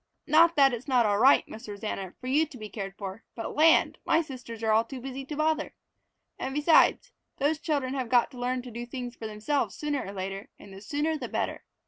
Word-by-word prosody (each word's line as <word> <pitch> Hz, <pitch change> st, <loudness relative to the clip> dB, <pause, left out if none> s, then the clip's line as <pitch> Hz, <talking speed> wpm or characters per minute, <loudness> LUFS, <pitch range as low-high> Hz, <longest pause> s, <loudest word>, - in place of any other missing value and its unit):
Not 330 Hz, +3 st, +5 dB
that 275 Hz, -3 st, +5 dB
it's 240 Hz, +3 st, -6 dB
not 250 Hz, -4 st, +3 dB
all 205 Hz, -1 st, +2 dB
right, 265 Hz, +4 st, +5 dB
Miss 220 Hz, 0 st, -10 dB
Rosanna, 200 Hz, -2 st, -5 dB
for -, -, -11 dB
you 295 Hz, +5 st, +2 dB
to 280 Hz, -, -12 dB
be 215 Hz, -2 st, -8 dB
cared 195 Hz, -1 st, -6 dB
for, 200 Hz, +2 st, -7 dB
but 225 Hz, -, -5 dB
land, 320 Hz, +2 st, +4 dB
my 330 Hz, -, +2 dB
sisters 245 Hz, -6 st, -9 dB
are 220 Hz, -, +2 dB
all 220 Hz, +1 st, +4 dB
too 255 Hz, +3 st, -8 dB
busy 270 Hz, +1 st, -6 dB
to 295 Hz, -, -6 dB
bother! 310 Hz, +1 st, 0 dB, 0.6 s
And 265 Hz, +1 st, -4 dB
besides, 315 Hz, +10 st, +4 dB, 0.3 s
those 295 Hz, +3 st, +1 dB
children 285 Hz, -6 st, -1 dB
have 260 Hz, -4 st, -3 dB
got 245 Hz, +3 st, +3 dB
to 250 Hz, -, -11 dB
learn 250 Hz, 0 st, -1 dB
to 250 Hz, -, -9 dB
do 240 Hz, +1 st, -6 dB, 0.2 s
for 225 Hz, -2 st, -7 dB
themselves 215 Hz, +7 st, -1 dB
sooner 295 Hz, -2 st, -2 dB
or 195 Hz, -, -7 dB
later, 195 Hz, 0 st, -5 dB
and 195 Hz, -, -13 dB
the 195 Hz, -, -11 dB
sooner 295 Hz, +7 st, -1 dB
the -, -, -5 dB
better. -, -, -3 dB
255 Hz, 220 wpm, -28 LUFS, 220-295 Hz, 0.6 s, Not